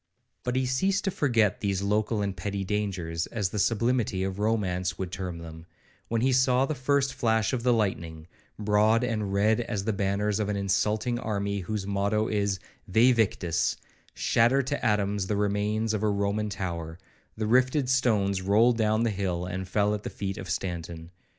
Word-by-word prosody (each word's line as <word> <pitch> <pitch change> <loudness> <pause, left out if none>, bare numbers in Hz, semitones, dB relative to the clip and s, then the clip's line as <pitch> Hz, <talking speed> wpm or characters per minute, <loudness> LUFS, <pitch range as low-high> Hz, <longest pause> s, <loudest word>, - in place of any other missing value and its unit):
But 125 0 -2
he 130 0 +1
ceased 190 +10 +1
to 195 - 0
forget 115 - +1
these 100 -2 -1
local 105 +1 0
and 100 -1 -2
petty 100 +2 -3
dangers, 95 -5 -2
as 105 -5 -2
the 105 - -3
sublimity 115 -3 +1
of 95 0 -3
romance 95 -5 0
would 95 -2 -4
term 90 -2 -4
them, 80 0 -10 0.4
when 115 -1 0
he 130 +2 +3
saw 130 0 +3
the 155 - -2
first 135 0 +1
flash 115 -3 +1
of 125 - -1
the 125 +1 +2
lightning, 85 -8 -1 0.3
broad 105 +2 +3
and 110 -5 -1
red 105 +3 +2
as 105 -4 -3
the 110 +1 0
banners 100 +1 0
of 105 -1 -1
an 105 - 0
insulting 105 +4 0
army 100 -3 -2
whose 100 +1 -3
motto 100 +2 0
is 100 -2 0 0.3
Væ 120 +6 +5
victis, 95 -7 0 0.4
shatter 125 +4 +3
to 145 +3 -3
atoms 105 -3 +1
the 105 - 0
remains 105 +2 0
of 105 - -1
a 110 - +2
Roman 100 +1 0
tower;—the 90 +3 -6
rifted 130 +4 +3
stones 110 -7 +2
rolled 110 +5 +3
down 110 +1 +2
the 115 - +1
hill 95 -3 -2
and 95 +1 -4
fell 105 +2 +1
at 105 - -3
the - - -5
feet 95 -1 -4
of 95 - -7
Stanton. 85 -2 -4
105 Hz, 180 wpm, -27 LUFS, 95-115 Hz, 0.4 s, Væ